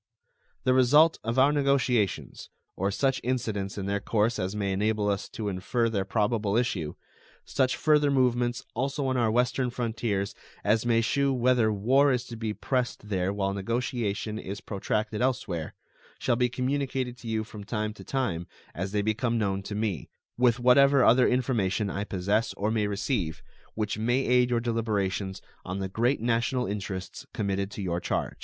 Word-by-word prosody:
The 130 - +3
result 145 +6 +5
of 115 +3 -2
our 135 +2 +6
negotiations, 135 -7 0 0.3
or 95 +2 0
such 135 +6 0
incidents 110 -6 -2
in 100 - -3
their 100 +1 0
course 110 +2 0
as 95 +3 -2
may 100 -2 -1
enable 105 +2 0
us 100 -1 -1
to 110 -3 -5
infer 105 +5 0
their 100 -4 -1
probable 105 0 +1
issue; 95 -11 -1 0.5
such 130 -2 +1
further 150 -2 +3
movements 120 -3 +1
also 135 +3 -1
on 130 -1 0
our 120 -3 +2
western 125 +2 +1
frontiers 115 -4 -2 0.3
as 110 +3 +2
may 115 -1 +4
shew 140 +4 +1
whether 125 -3 +3
war 130 +8 +3
is 125 -1 0
to 120 - -8
be 110 -1 -3
pressed 125 -2 -2
there 95 -1 0
while 100 -1 -1
negotiation 110 0 -2
is 100 0 -6
protracted 105 +2 -2
elsewhere, 105 -11 -1 0.4
shall - - +1
be 125 +1 +2
communicated 130 0 -2
to 115 - -10
you 110 -1 -1
from 105 -2 -10
time 105 0 -2
to - - -12
time 95 -11 -2 0.3
as 95 +5 -4
they 105 -1 +1
become 115 +2 0
known 100 -3 0
to 105 +2 -6
me, 105 - -2 0.3
with 120 -1 +3
whatever 135 +2 +5
other 125 +2 +6
information 110 -6 0
I 100 +2 -3
possess 100 +4 0
or 105 +2 -1
may 110 -2 +1
receive, 100 - -2 0.3
which 110 -1 -2
may 120 +4 +2
aid 125 0 +4
your 120 -1 +1
deliberations 105 -5 -1 0.2
on 90 +1 -4
the 95 -1 -2
great 120 +8 +1
national 120 +3 0
interests 100 -3 -5
committed 100 -1 -1
to 105 -1 -6
your 85 -2 -1
charge. - - -2
110 Hz, 170 wpm, -27 LUFS, 100-125 Hz, 0.5 s, our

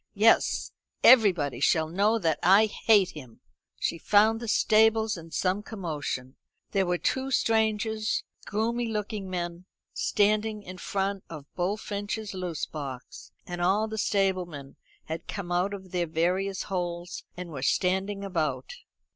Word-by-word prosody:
Yes, 220 +3 +3 0.3
everybody 180 - +5
shall 160 +3 +3
know 200 +7 +2
that 165 -7 0
I 195 +5 +6
hate 205 -2 +3
him." 130 -7 -12 0.4
She 170 - -1
found 215 +5 +4
the 235 - -6
stables 220 0 +3
in 165 -2 -10
some 185 +4 0
commotion. 150 - -5 0.3
There 195 -2 +1
were 180 0 +1
two 265 +8 -1
strangers, 220 -2 +1 0.2
groomy 230 +2 -1
looking 210 -2 -3
men, 175 -1 -4 0.3
standing 210 +1 +1
in 185 -1 -9
front 195 0 -2
of 155 -4 -8
Bullfinch's 205 +2 -3
loose 180 -4 -3
box, 140 -4 -8
and 175 0 -5
all 200 +5 +2
the 220 0 -5
stablemen 180 -9 -1 0.3
had 160 +1 -6
come 190 -4 -5
out 180 +3 +1
of 190 -2 -8
their 175 -2 0
various 185 +4 0
holes, 175 -2 -4
and 180 -1 -6
were 140 -4 -6
standing 190 +7 0
about. 180 - -2
190 Hz, 140 wpm, -27 LUFS, 175-215 Hz, 0.4 s, I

